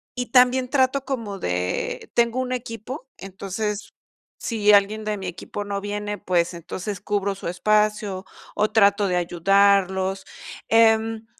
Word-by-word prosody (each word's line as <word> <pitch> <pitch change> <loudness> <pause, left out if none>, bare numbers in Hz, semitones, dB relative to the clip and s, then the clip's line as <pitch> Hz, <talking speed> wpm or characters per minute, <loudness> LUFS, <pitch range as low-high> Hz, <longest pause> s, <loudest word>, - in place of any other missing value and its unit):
y 250 -1 -3
también 255 0 +4
trato 265 0 +1
como 225 -7 -4
de 305 - -3
tengo 235 +1 +2
un 255 0 -4
equipo, 250 +2 -6
entonces, 200 +2 -5 0.4
si 210 -3 +2
alguien 210 +2 +3
de 215 0 -1
mi 190 -2 -6
equipo 180 +3 -6
no 200 -1 -3
viene, 205 0 -4
pues, 175 -1 0
entonces 180 +3 -6
cubro 200 -1 -1
su 195 - -7
espacio 210 +1 0 0.3
o 215 - +1
trato 200 -1 +4
de 180 - 0
ayudarlos, 190 +2 +2 0.4
em, 225 0 +3
205 Hz, 135 wpm, -23 LUFS, 195-230 Hz, 0.4 s, también